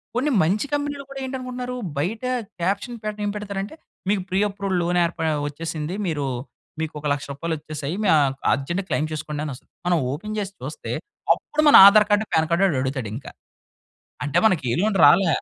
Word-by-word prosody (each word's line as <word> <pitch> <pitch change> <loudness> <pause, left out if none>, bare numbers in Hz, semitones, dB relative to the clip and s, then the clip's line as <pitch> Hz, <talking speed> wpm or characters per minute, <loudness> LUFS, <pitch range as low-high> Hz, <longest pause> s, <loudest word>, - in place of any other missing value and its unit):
కొన్ని 280 +4 +1
మంచి 200 - +1
కంపెనీలు 285 -1 -2
కూడా 275 0 -7
ఏంటనుకుంటున్నారు, 255 -1 -5 0.2
బయట 205 - -2 0.4
క్యాప్షన్ 200 +7 -1
పెట్టడం 210 0 -4
ఏం - - 0
పెడతారంటే, 200 +3 -5 0.3
మీకు 200 -2 +2
ప్రీ 190 +1 +1
అప్రూవడ్ 195 -1 -3
లోన్ 175 +1 +1
ఏర్ప 170 0 -5 0.3
వచ్చేసింది. 160 +3 -4
మీరు 150 -4 -1 0.6
మీకోక 150 -1 -4
1,00,000 145 0 -4
రూపాయలొచ్చేసాయి 155 0 -4
మీ - - +1
ఆహ్, 135 -2 +2 0.2
అర్జెంట్‌గా 170 +8 -2
క్లెయిమ్ 155 +1 0
చేసుకోండి 150 -1 -4
అనొస్తది. 135 -4 -8 0.2
మనం 175 - +3
ఓపెన్ 210 +10 -5
చేసి 200 -1 -4
చూస్తే 150 +4 -6 0.4
అప్పుడు 305 - -2
మన - - +8
ఆధార్ 210 0 +6
కార్డు, 205 +1 +3
పాన్ 160 0 +3
కార్డ్ 180 +4 +3
ఆడడుగుతాడు 130 - -1
ఇంకా. 135 - -8 0.9
అంటే 145 - +1
మనకే 150 - +1
లోన్ 210 -1 +1
రాలే. 170 +5 +6
180 Hz, 165 wpm, -23 LUFS, 150-210 Hz, 0.9 s, మన